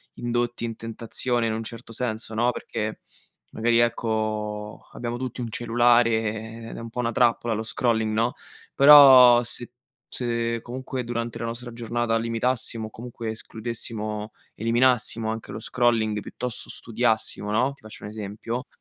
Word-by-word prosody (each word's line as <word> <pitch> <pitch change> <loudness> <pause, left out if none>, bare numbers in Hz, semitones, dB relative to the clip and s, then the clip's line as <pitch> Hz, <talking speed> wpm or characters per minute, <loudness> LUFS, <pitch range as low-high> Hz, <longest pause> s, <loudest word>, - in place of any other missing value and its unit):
indotti 120 0 -2
in 115 -1 -4
tentazione, 115 +2 -2
in 110 - -1
un 110 +1 -3
certo 115 0 -9
senso, 110 -1 -3
no, 120 +3 +2
perché 110 -2 -5 0.5
magari, 115 +1 +2
ecco, 110 -2 -1
abbiamo 120 0 -4
tutti 125 0 -5
un 120 - -4
cellulare 120 +1 +3
e 110 0 -3
ed - - -8
è - - -6
un 115 0 -7
po' 120 - -7
una 115 -1 0
trappola 120 -1 +2
lo 110 - -2
scrolling 110 -1 0
no. 115 +3 +1 0.4
Però 135 -4 +9
se 120 0 -5 0.4
se 115 -1 -1
comunque 130 +1 -5
durante 115 -1 -3
la - - -3
nostra 120 +1 -5
giornata 115 0 -1
limitassimo 115 0 -1
o - - -11
comunque 115 0 -7
escludessimo 110 -1 -5 0.2
eliminassimo 115 -1 +2
anche 110 0 -6
lo - - -6
scrolling 115 -3 +1
e - - -3
piuttosto 125 +3 -4
studiassimo, 110 -2 -1
no, 125 +6 +2
ti 140 - -23
faccio 110 0 -10
un 105 - -6
esempio, 110 +3 -5
115 Hz, 155 wpm, -25 LUFS, 110-120 Hz, 0.5 s, Però